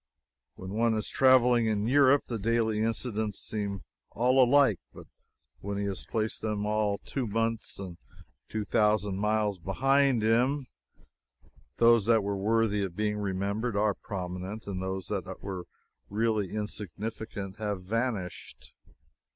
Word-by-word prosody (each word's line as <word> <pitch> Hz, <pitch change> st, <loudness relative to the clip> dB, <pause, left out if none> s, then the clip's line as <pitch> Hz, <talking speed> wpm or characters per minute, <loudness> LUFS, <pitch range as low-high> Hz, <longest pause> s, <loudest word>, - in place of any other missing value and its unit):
When 95 Hz, 0 st, -8 dB
one 115 Hz, +2 st, +2 dB
is 110 Hz, -, -2 dB
traveling 125 Hz, -3 st, +5 dB
in 105 Hz, -1 st, 0 dB
Europe, 140 Hz, +2 st, +5 dB
the 115 Hz, -2 st, -4 dB
daily 110 Hz, 0 st, +1 dB
incidents 110 Hz, -2 st, -1 dB
seem 100 Hz, -3 st, -4 dB, 0.3 s
all 130 Hz, +3 st, +4 dB
alike; 130 Hz, -, +4 dB
but -, -, -12 dB, 0.5 s
when 100 Hz, +1 st, -4 dB
he 100 Hz, -, -1 dB
has 100 Hz, -1 st, -3 dB
placed 110 Hz, -1 st, -2 dB
them 105 Hz, -1 st, -2 dB
all 105 Hz, -1 st, +1 dB
two 130 Hz, +2 st, -4 dB
months 115 Hz, +1 st, -2 dB
and 90 Hz, -3 st, -8 dB, 0.5 s
two 110 Hz, -1 st, -3 dB
thousand 105 Hz, -2 st, +2 dB
miles 105 Hz, -2 st, +1 dB
behind 135 Hz, +6 st, +2 dB
him, 125 Hz, +5 st, +2 dB, 1.1 s
those 115 Hz, -2 st, +5 dB
that 115 Hz, -3 st, +4 dB
were 100 Hz, 0 st, -1 dB
worthy 105 Hz, +1 st, +1 dB
of 95 Hz, -3 st, -3 dB
being 105 Hz, +1 st, -1 dB
remembered 100 Hz, +3 st, -2 dB
are 105 Hz, 0 st, +2 dB
prominent, 95 Hz, +3 st, -6 dB
and 95 Hz, -2 st, -4 dB
those 95 Hz, 0 st, -3 dB
that -, -, -4 dB
were 95 Hz, -3 st, -5 dB, 0.4 s
really 105 Hz, -2 st, 0 dB
insignificant 105 Hz, 0 st, -5 dB
have 105 Hz, -3 st, -3 dB
vanished. 110 Hz, -2 st, -4 dB
105 Hz, 135 wpm, -29 LUFS, 100-115 Hz, 1.1 s, traveling